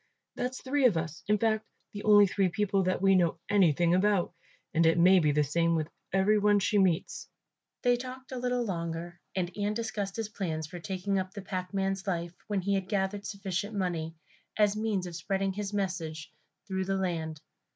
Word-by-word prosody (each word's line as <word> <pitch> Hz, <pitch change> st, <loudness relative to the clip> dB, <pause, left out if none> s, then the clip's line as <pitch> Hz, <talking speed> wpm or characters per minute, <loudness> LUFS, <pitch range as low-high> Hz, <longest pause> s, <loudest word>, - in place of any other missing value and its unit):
That's 255 Hz, +1 st, -3 dB
three 270 Hz, 0 st, +3 dB
of 200 Hz, -9 st, +1 dB
us, 165 Hz, 0 st, -4 dB
in 210 Hz, +1 st, +3 dB
fact 220 Hz, 0 st, +1 dB, 0.3 s
the 205 Hz, -, -5 dB
only 205 Hz, -1 st, +8 dB, 0.2 s
people 200 Hz, +1 st, +1 dB
that 185 Hz, +1 st, 0 dB
we 195 Hz, 0 st, +6 dB
know 175 Hz, -3 st, +3 dB
anything 175 Hz, -4 st, +4 dB
about, 190 Hz, -1 st, +2 dB, 0.4 s
and 165 Hz, 0 st, +3 dB
it 165 Hz, -, +3 dB
may 185 Hz, +2 st, +6 dB
be 150 Hz, -3 st, +3 dB
the 150 Hz, +1 st, +3 dB
same 165 Hz, +4 st, +1 dB
with 155 Hz, -1 st, -1 dB, 0.2 s
every 195 Hz, +3 st, +3 dB
one 205 Hz, 0 st, +4 dB
she 205 Hz, +1 st, +2 dB
meets." 180 Hz, -4 st, 0 dB, 0.5 s
They 245 Hz, -1 st, +4 dB
talked 255 Hz, +1 st, -8 dB
a 255 Hz, -, -4 dB
little 245 Hz, -1 st, 0 dB
longer 170 Hz, -2 st, -4 dB, 0.2 s
and 180 Hz, -2 st, -2 dB
Ian 205 Hz, 0 st, -1 dB
discussed 210 Hz, -4 st, -3 dB
his 225 Hz, -2 st, -2 dB
plans 165 Hz, -7 st, -3 dB
for 175 Hz, +3 st, -8 dB
taking 190 Hz, +4 st, -2 dB
up 185 Hz, +1 st, -5 dB
the 200 Hz, -, -6 dB
packman's 190 Hz, +1 st, -2 dB
life 170 Hz, -2 st, -2 dB
when 205 Hz, -3 st, 0 dB
he 200 Hz, +2 st, 0 dB
had 190 Hz, -1 st, -1 dB
gathered 200 Hz, 0 st, -1 dB
sufficient 200 Hz, +1 st, -3 dB
money, 170 Hz, -4 st, -2 dB, 0.4 s
as 210 Hz, -1 st, +3 dB
a -, -, -3 dB
means 210 Hz, -4 st, -1 dB
of 175 Hz, -2 st, -7 dB
spreading 195 Hz, +3 st, -1 dB
his 205 Hz, 0 st, -4 dB
message 180 Hz, -6 st, -3 dB, 0.3 s
through 190 Hz, -1 st, -2 dB
the 195 Hz, 0 st, 0 dB
land. 165 Hz, -5 st, -2 dB
190 Hz, 195 wpm, -29 LUFS, 175-210 Hz, 0.5 s, only